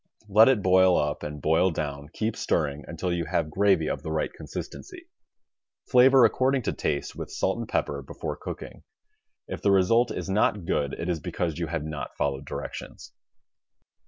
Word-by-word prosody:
Let 105 Hz, +4 st, +6 dB
it 120 Hz, -7 st, +2 dB
boil 95 Hz, -1 st, +5 dB
up 75 Hz, 0 st, -1 dB
and 75 Hz, 0 st, -6 dB
boil 80 Hz, +6 st, +3 dB
down, 75 Hz, -3 st, -4 dB
keep 110 Hz, +3 st, -2 dB
stirring, 75 Hz, -2 st, -1 dB
until 85 Hz, +2 st, -3 dB
you 85 Hz, -1 st, -1 dB
have 80 Hz, -1 st, -1 dB
gravy 95 Hz, -3 st, +3 dB
of -, -, -2 dB
the 80 Hz, -, -5 dB
right 80 Hz, 0 st, -1 dB
consistency. 365 Hz, -3 st, -8 dB, 0.8 s
Flavor 130 Hz, 0 st, +6 dB
according 130 Hz, 0 st, +2 dB
to -, -, -1 dB
taste, 70 Hz, -2 st, -2 dB
with -, -, -6 dB
salt -, -, -1 dB
and -, -, -5 dB
pepper, 70 Hz, 0 st, -1 dB
before 65 Hz, -, -6 dB
cooking. -, -, -8 dB, 0.7 s
If -, -, -6 dB
the -, -, +2 dB
result 100 Hz, +6 st, +4 dB
is -, -, -4 dB
not 95 Hz, -1 st, +1 dB
good 70 Hz, -3 st, -1 dB
it 85 Hz, -, -4 dB
is 85 Hz, -2 st, -1 dB
because 85 Hz, -1 st, -3 dB
you 85 Hz, -, -2 dB
have 80 Hz, -1 st, -3 dB
not 80 Hz, -1 st, -6 dB
followed 70 Hz, -1 st, -1 dB
directions. -, -, -7 dB
85 Hz, 175 wpm, -26 LUFS, 75-105 Hz, 0.8 s, Let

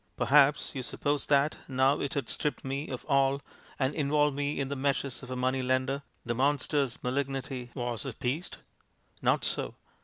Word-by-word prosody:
Perhaps 145 Hz, +1 st, +4 dB
you 135 Hz, -, -3 dB
suppose 145 Hz, +3 st, -1 dB
that, 145 Hz, +1 st, +3 dB
now 135 Hz, +2 st, +3 dB
it 140 Hz, +3 st, -2 dB
had 140 Hz, -5 st, -1 dB
stripped 150 Hz, +3 st, -2 dB
me 140 Hz, +3 st, -3 dB
of 130 Hz, -, -5 dB
all 140 Hz, -1 st, +3 dB, 0.4 s
and 135 Hz, 0 st, +1 dB
involved 150 Hz, -1 st, +2 dB
me 145 Hz, +1 st, -1 dB
in 135 Hz, -, 0 dB
the 140 Hz, -, -3 dB
meshes 135 Hz, -1 st, -1 dB
of 130 Hz, -, -10 dB
a 130 Hz, -, -3 dB
money 130 Hz, +1 st, +1 dB
lender, 130 Hz, +2 st, +1 dB, 0.2 s
the 120 Hz, -, 0 dB
monster's 140 Hz, 0 st, +1 dB
malignity 135 Hz, -1 st, -2 dB
was 120 Hz, -3 st, -2 dB
appeased? 135 Hz, +5 st, -3 dB, 0.6 s
Not -, -, +2 dB
so! -, -, -1 dB
135 Hz, 165 wpm, -30 LUFS, 130-145 Hz, 0.6 s, Perhaps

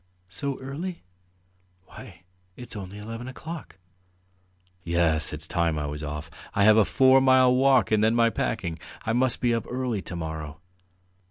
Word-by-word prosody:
"So 135 Hz, +9 st, -3 dB
early? 160 Hz, +7 st, -6 dB, 0.8 s
Why, 90 Hz, -, -13 dB, 0.3 s
it's 125 Hz, -2 st, -10 dB
only 100 Hz, -1 st, -7 dB
eleven 115 Hz, +3 st, -7 dB
o'clock." 155 Hz, -, -8 dB, 1.1 s
"Yes, 85 Hz, -3 st, +1 dB
it's 75 Hz, +2 st, -6 dB
time 85 Hz, -3 st, 0 dB
I 75 Hz, -, -2 dB
was 75 Hz, +1 st, -5 dB
off. 75 Hz, +2 st, -6 dB, 0.2 s
I 100 Hz, -, +3 dB
have 110 Hz, +1 st, +7 dB
a 110 Hz, -, +5 dB
four 130 Hz, +4 st, +5 dB
mile 130 Hz, -1 st, +5 dB
walk 135 Hz, -1 st, +4 dB
and 110 Hz, -1 st, +3 dB
then 110 Hz, +1 st, +3 dB
my 115 Hz, -1 st, +4 dB
packing. 85 Hz, -10 st, -3 dB, 0.3 s
I 110 Hz, -, 0 dB
must 125 Hz, +1 st, +2 dB
be 120 Hz, -2 st, +2 dB
up 115 Hz, -, -2 dB
early 125 Hz, -5 st, -2 dB
to 90 Hz, -, -7 dB
morrow." 80 Hz, -2 st, -6 dB
110 Hz, 160 wpm, -26 LUFS, 85-130 Hz, 1.1 s, have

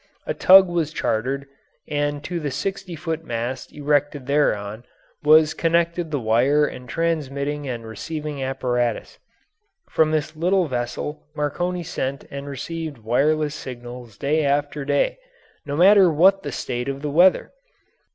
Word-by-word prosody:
A -, -, -1 dB
tug 190 Hz, 0 st, +7 dB
was 170 Hz, -3 st, -1 dB
chartered, 135 Hz, +1 st, -1 dB, 0.4 s
and 145 Hz, 0 st, -2 dB
to 175 Hz, +1 st, -3 dB
the 150 Hz, -3 st, -3 dB
sixty 190 Hz, +4 st, -4 dB
foot 165 Hz, 0 st, -4 dB
mast 120 Hz, 0 st, -4 dB
erected 145 Hz, -1 st, 0 dB
thereon 110 Hz, -6 st, 0 dB, 0.4 s
was 155 Hz, +1 st, +5 dB
connected 170 Hz, 0 st, 0 dB
the 145 Hz, -2 st, -1 dB
wire 125 Hz, +6 st, +3 dB
and 125 Hz, -4 st, -7 dB
transmitting 145 Hz, -3 st, -2 dB
and 115 Hz, -2 st, -5 dB
receiving 150 Hz, +5 st, -5 dB
apparatus. 125 Hz, -3 st, -2 dB, 0.7 s
From 160 Hz, -1 st, +3 dB
this 155 Hz, 0 st, -1 dB
little 180 Hz, +3 st, +2 dB
vessel 120 Hz, -, -4 dB
Marconi 175 Hz, +5 st, -2 dB
sent 140 Hz, -4 st, -4 dB
and 140 Hz, 0 st, -6 dB
received 155 Hz, +2 st, -5 dB
wireless 145 Hz, +7 st, +1 dB
signals 120 Hz, -4 st, -9 dB
day 150 Hz, +3 st, +1 dB
after 145 Hz, +1 st, 0 dB
day, 145 Hz, -, 0 dB, 0.5 s
no 145 Hz, -, -2 dB
matter 190 Hz, 0 st, +6 dB
what 190 Hz, +5 st, +4 dB
the -, -, -5 dB
state 125 Hz, +2 st, -3 dB
of 135 Hz, +1 st, -5 dB
the 150 Hz, -, -2 dB
weather. 180 Hz, +5 st, +4 dB
145 Hz, 140 wpm, -22 LUFS, 130-165 Hz, 0.7 s, tug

